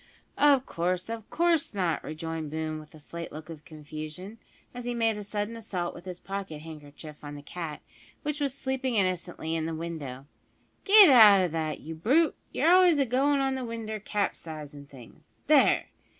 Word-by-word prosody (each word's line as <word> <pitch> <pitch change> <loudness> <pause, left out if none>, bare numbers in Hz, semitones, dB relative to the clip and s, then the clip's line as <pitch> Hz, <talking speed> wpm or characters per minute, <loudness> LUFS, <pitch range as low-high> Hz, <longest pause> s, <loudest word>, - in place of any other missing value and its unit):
"Of 280 -3 +5
course 180 +3 -2
of 225 -2 -6
course 330 -6 +1
not," 175 -5 0
rejoined 160 0 -5
Boone 155 0 -3
with 155 0 -14
a - - -13
slight 170 +3 -8
look 155 +2 -9
of 155 -2 -10
confusion, 155 +6 -9 0.3
as 245 -1 -7
he 245 0 -2
made 225 -2 +1
a 210 - -6
sudden 205 +2 -3
assault 190 -6 -4
with 175 - -12
his 180 -1 -7
pocket 195 -6 -6
handkerchief 150 -1 -11
on 145 0 -7
the 145 - -10
cat, 160 -1 -6 0.4
which 295 0 -2
was 280 -2 +1
sleeping 265 -2 -2
innocently 180 -4 -1
in 160 -1 -1
the 165 - -3
window; 150 -6 -6 0.6
"git 400 -5 +9
out 210 -6 +8
o' 180 - +2
that, 160 -1 -3
you 160 - -7
brute; 265 - +2 0.2
you're - - 0
always 360 -3 +6
agoin' 275 +2 +2
in 270 0 +1
the 260 -1 -3
winder, 225 -2 -5
capsizin' 155 -8 -4
things. 130 -5 -16
There! - - +4
180 Hz, 180 wpm, -28 LUFS, 155-240 Hz, 0.6 s, git